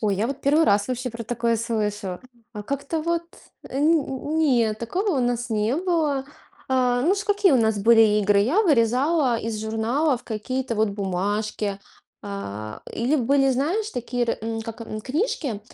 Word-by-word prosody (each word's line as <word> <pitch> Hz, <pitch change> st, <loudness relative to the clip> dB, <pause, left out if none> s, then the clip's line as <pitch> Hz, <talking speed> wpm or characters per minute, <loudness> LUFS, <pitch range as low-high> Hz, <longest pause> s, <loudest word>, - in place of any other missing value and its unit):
Ой, 210 Hz, -3 st, +1 dB
я 210 Hz, +4 st, 0 dB
вот 275 Hz, +2 st, -5 dB
1 300 Hz, +4 st, +3 dB
раз 205 Hz, -2 st, +2 dB
вообще 255 Hz, 0 st, -3 dB
про 230 Hz, 0 st, -7 dB
такое 235 Hz, 0 st, 0 dB
слышу. 210 Hz, -4 st, -2 dB, 0.3 s
А 210 Hz, -2 st, -6 dB
как-то 280 Hz, +7 st, -3 dB
вот, 335 Hz, +1 st, 0 dB, 0.5 s
э, 265 Hz, -, -4 dB
нь 300 Hz, -1 st, +1 dB
не, 245 Hz, -9 st, +3 dB
такого 340 Hz, -, -2 dB
у -, -, +2 dB
нас 245 Hz, 0 st, -1 dB
не 215 Hz, +2 st, +1 dB
было. 320 Hz, -6 st, 0 dB, 0.4 s
А, 250 Hz, -2 st, +2 dB
ну 350 Hz, +8 st, +3 dB
ш 405 Hz, 0 st, -4 dB
какие 410 Hz, -3 st, +3 dB
у -, -, +5 dB
нас 220 Hz, -3 st, +2 dB
были 225 Hz, +3 st, +5 dB, 0.2 s
игры? 205 Hz, -1 st, +3 dB
Я 290 Hz, -, +3 dB
вырезала 260 Hz, -, +2 dB
из 225 Hz, -1 st, -4 dB
журналов 235 Hz, +6 st, 0 dB
какие-то 250 Hz, +3 st, -3 dB
вот 215 Hz, 0 st, +2 dB
бумажки. 200 Hz, +1 st, -2 dB, 0.5 s
А, 110 Hz, -, -6 dB
или 255 Hz, +6 st, +1 dB
были, 270 Hz, +1 st, +3 dB
знаешь, 340 Hz, -, 0 dB
такие 245 Hz, -, -2 dB
р -, -, -1 dB
м, 225 Hz, 0 st, -3 dB
как, 225 Hz, +1 st, -8 dB
м, 215 Hz, -1 st, -6 dB
книжки, 275 Hz, -, -2 dB
240 Hz, 170 wpm, -24 LUFS, 215-285 Hz, 0.5 s, у